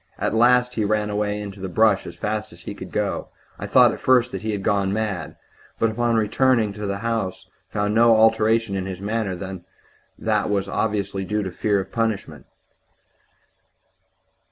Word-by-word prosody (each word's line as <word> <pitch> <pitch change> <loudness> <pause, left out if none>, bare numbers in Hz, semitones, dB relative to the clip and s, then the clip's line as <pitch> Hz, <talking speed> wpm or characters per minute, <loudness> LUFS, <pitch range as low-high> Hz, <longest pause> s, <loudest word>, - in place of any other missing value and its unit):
At - - -1
last 125 +2 +4
he 110 - -1
ran 105 0 0
away 105 0 -1
into 100 -1 -7
the 95 0 -5
brush 105 0 +3
as - - -8
fast 105 0 -3
as - - -15
he - - -6
could - - -9
go. - - -2 0.3
I - - -5
thought - - +6
at - - -8
first 125 -1 +3
that - - -5
he 110 - -4
had 100 -2 -3
gone 100 -2 +1
mad, 100 -6 -3 0.4
but 110 -1 0
on 120 0 +1
returning 110 0 +2
to 105 0 -5
the 100 0 -2
house 115 -5 -2 0.2
found 105 0 -1
no 115 +1 +5
other 110 -1 +5
alteration 110 -1 +3
in 95 -1 -3
his 95 -1 -6
manner 105 -1 -2
than 95 0 -7 0.5
what - - 0
was 100 -1 0
obviously 100 -1 -1
due 105 +2 -1
to 95 - -4
fear 100 +2 0
of 95 - -6
punishment. 105 - -3
105 Hz, 185 wpm, -23 LUFS, 100-110 Hz, 0.5 s, thought